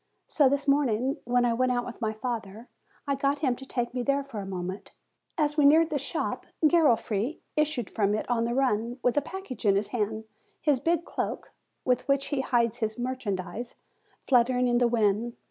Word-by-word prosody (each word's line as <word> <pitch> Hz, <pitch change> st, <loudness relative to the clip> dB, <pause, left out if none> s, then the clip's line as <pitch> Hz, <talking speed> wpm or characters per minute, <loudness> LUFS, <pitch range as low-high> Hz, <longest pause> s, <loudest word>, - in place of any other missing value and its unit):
So 285 Hz, -4 st, +3 dB
this 280 Hz, +1 st, -1 dB
morning 270 Hz, -2 st, +2 dB
when 245 Hz, 0 st, +2 dB
I 235 Hz, -, +2 dB
went 255 Hz, +2 st, +1 dB
out 245 Hz, -1 st, 0 dB
with 245 Hz, -, -9 dB
my 220 Hz, -1 st, 0 dB
father, 220 Hz, -1 st, -5 dB, 0.4 s
I 280 Hz, -, 0 dB
got 275 Hz, +1 st, 0 dB
him 255 Hz, -2 st, +2 dB
to 265 Hz, -, -11 dB
take 240 Hz, -2 st, -2 dB
me 250 Hz, -, -1 dB
there 280 Hz, +2 st, +1 dB
for 265 Hz, -6 st, -7 dB
a 195 Hz, -, -6 dB
moment. 185 Hz, +1 st, -5 dB, 0.4 s
As 300 Hz, -1 st, +1 dB
we 300 Hz, -, +4 dB
neared 315 Hz, +3 st, +5 dB
the 290 Hz, -, 0 dB
shop, 275 Hz, -, -3 dB, 0.2 s
Garofri 265 Hz, -, +2 dB, 0.2 s
issued 300 Hz, -7 st, 0 dB
from 205 Hz, -1 st, 0 dB
it 215 Hz, -, -3 dB
on 230 Hz, -1 st, +1 dB
a 235 Hz, -, -2 dB
run, 240 Hz, -2 st, 0 dB
with 245 Hz, -, +2 dB
a 290 Hz, -, +3 dB
package 325 Hz, -, -7 dB
in 200 Hz, -2 st, +4 dB
his 200 Hz, +1 st, 0 dB
hand, 220 Hz, -2 st, -2 dB, 0.4 s
his 290 Hz, -4 st, +2 dB
big 335 Hz, +3 st, 0 dB
cloak, -, -, -4 dB, 0.3 s
with 250 Hz, +1 st, +1 dB
which 275 Hz, 0 st, +1 dB
he 285 Hz, -3 st, 0 dB
hides 235 Hz, -3 st, +1 dB
his 220 Hz, 0 st, -2 dB
merchandise, 240 Hz, -3 st, -4 dB, 0.5 s
fluttering 250 Hz, -1 st, +3 dB
in 240 Hz, 0 st, +2 dB
the 245 Hz, -, +4 dB
wind. 230 Hz, 0 st, +1 dB
245 Hz, 195 wpm, -27 LUFS, 225-275 Hz, 0.5 s, neared